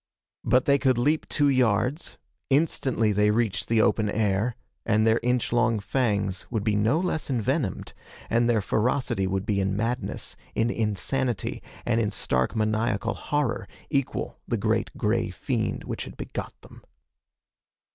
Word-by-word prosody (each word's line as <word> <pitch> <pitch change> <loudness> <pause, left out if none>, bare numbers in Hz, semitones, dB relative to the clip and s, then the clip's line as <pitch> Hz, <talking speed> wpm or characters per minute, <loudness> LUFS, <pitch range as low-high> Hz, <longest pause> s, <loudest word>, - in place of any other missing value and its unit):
But 125 +2 +3
they 140 0 +4
could 130 -2 +2
leap 150 +6 +1
two 145 -1 +2
yards, 130 +3 +1 0.3
instantly 135 -6 +2
they 105 +1 +3
reached 105 -4 0
the 115 -1 +3
open 110 -2 +2
air, 105 +2 0 0.3
and 110 -1 +2
their 115 +1 +4
inch 125 -1 0
long 115 -1 +3
fangs 100 -4 0
would 110 -4 -2
be 105 -1 +1
no 110 +9 +2
less 175 -5 -2
envenomed, 130 - -1 0.3
and 120 +1 +2
their 115 -3 +3
ferocity 110 -2 0
would 95 +1 -1
be 100 -2 0
in 95 +1 0
madness, 120 +4 -2 0.2
in 115 +1 +2
insanity 115 +2 -1 0.2
and 115 -1 +2
in 105 - +1
stark 65 - 0
maniacal 110 -1 0
horror 145 -5 -1 0.2
equal 140 -3 -1
the - - 0
great - - 0
gray - - +1
fiend - - -2
which - - -4
had - - -11
begot - - -6
them. - - -15
115 Hz, 150 wpm, -26 LUFS, 105-130 Hz, 0.3 s, they